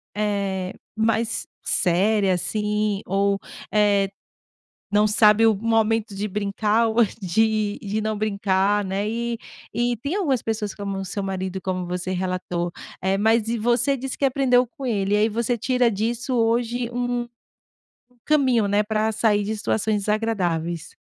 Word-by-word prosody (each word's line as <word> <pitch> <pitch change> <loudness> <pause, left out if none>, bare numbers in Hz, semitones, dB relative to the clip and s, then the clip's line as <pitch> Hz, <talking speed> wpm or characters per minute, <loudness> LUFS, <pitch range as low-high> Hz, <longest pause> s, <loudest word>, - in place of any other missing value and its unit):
eh, 200 -3 -1 0.2
mais 225 +1 0 0.2
séria 195 +2 +2
assim 210 +2 -1
ou, 200 +1 +1 0.4
eh, 200 -2 +3 0.8
não 210 +1 +4
sabe 215 +1 +5
o 220 - +5
momento 225 0 +1
de 210 +2 -2
brincar 210 +3 +1
ou 230 +1 +4 0.2
de 215 +2 +1
de 210 +1 -2
não 215 -1 -2
brincar, 200 -1 +1
né, 195 +2 -2
e 235 +1 -2 0.3
e 240 0 0
tem 290 - -3
algumas 280 - 0
pessoas 215 -2 -3
como 200 -1 -4
o 195 - -3
seu 200 +2 -4
marido 190 -1 -3
como 185 -1 -2
você 180 +1 -3
relatou. 180 -2 -2 0.3
Eh, 190 +1 +1
mas 220 +2 +3 0.2
você 245 +4 +2
disse 265 +1 -5
que 280 - 0
aprendeu 255 -2 +3
com 275 +2 -10
ele, 205 -4 0
e - - +5
aí 215 - +3
você 235 +2 -1
tira 250 +1 +2
disso 230 +4 -2
hoje 235 +1 +1
um 245 0 -2 0.8
um 245 -1 -31
caminho, 260 -8 +3
né, 205 +1 +3
para 220 +1 0
sair 210 -1 +2
de 215 +2 -2
situações 210 -1 0
desagradáveis. 175 -7 -1
215 Hz, 150 wpm, -23 LUFS, 195-230 Hz, 0.8 s, sabe